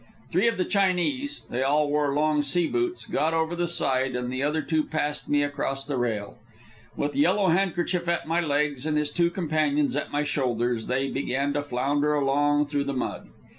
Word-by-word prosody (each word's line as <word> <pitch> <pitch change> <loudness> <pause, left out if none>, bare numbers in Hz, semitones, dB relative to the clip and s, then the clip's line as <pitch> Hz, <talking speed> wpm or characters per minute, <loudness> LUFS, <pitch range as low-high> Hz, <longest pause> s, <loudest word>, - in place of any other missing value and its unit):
Three 185 +7 +3
of 230 - +1
the 185 - +1
Chinese 205 +9 0
they 120 - -1
all 145 +2 +2
wore 145 -1 +1
long 150 0 +2
sea 155 +5 +2
boots 360 - -1
got 160 +2 0
over 160 +1 0
the 175 0 -1
side, 135 -6 +1
and 125 0 -3
the 130 - -2
other 150 +2 0
two 160 -2 +1
passed 150 -1 -2
me 145 0 +3
across 135 -1 -2
the 145 -1 -3
rail. 115 -2 -2 0.6
With 145 -1 -2
Yellow 185 +7 +3
Handkerchief 175 0 0
at 170 - -1
my 165 +2 +1
legs 145 -2 0
and 155 -1 +1
his 150 -1 0
two 170 +2 +2
companions 155 -5 0
at 145 - -3
my 145 +1 0
shoulders, 120 -5 -1
they 135 +2 -1
began 140 +1 -1
to 145 - 0
flounder 145 +2 0
along 145 +1 +2
through 145 -1 -2
the 140 - -2
mud. 130 - -4
145 Hz, 195 wpm, -26 LUFS, 140-165 Hz, 0.6 s, Three